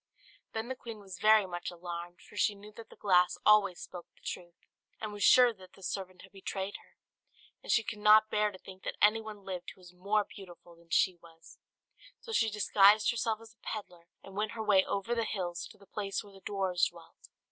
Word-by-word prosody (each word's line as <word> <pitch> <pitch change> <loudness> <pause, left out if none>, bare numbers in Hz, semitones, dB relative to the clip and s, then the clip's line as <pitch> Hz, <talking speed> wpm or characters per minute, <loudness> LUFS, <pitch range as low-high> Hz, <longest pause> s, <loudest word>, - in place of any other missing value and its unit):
Then 220 +1 -3
the 260 - -2
queen 230 -3 -8
was 190 -3 -10
very 215 -1 +6
much 175 -1 -5
alarmed; 175 0 -7
for - - -16
she 205 0 +2
knew 205 +1 -13
that 225 +2 -12
the - - -14
glass 180 -3 +3
always 205 -4 +5
spoke 180 -2 -9
the - - -26
truth, 175 -1 -6 0.4
and 215 -1 -5
was 205 -1 -3
sure 250 -2 +7
that 190 -3 -16
the 195 - -16
servant 185 -1 -5
had - - -15
betrayed 195 0 -5
her. - - -23 0.6
And - - -4
she 225 - +4
could 210 0 -6
not 215 +1 +6
bear 210 0 +2
to 195 - -11
think 190 0 -13
that - - -5
anyone 215 -1 +2
lived 185 -2 -5
who - - -24
was 180 -1 -15
more 200 +4 +1
beautiful 175 -3 -13
than 170 0 -22
she 180 +2 +3
was; 165 -1 -17 0.6
so 465 - -9
she 225 - +2
disguised 210 +1 +5
herself 225 -2 -1
as 225 0 -14
a - - -40
pedlar 175 -6 -7 0.2
and 195 - -12
went 215 +2 -1
her 220 - -4
way 200 -3 +5
over 200 +4 -2
the 230 -1 0
hills 180 -5 -3
to 210 - -16
the 200 - -18
place 200 -1 -3
where 205 -1 -15
the 195 - -15
dwarfs 190 -3 0
dwelt. 170 -1 -17
200 Hz, 220 wpm, -31 LUFS, 180-215 Hz, 0.6 s, sure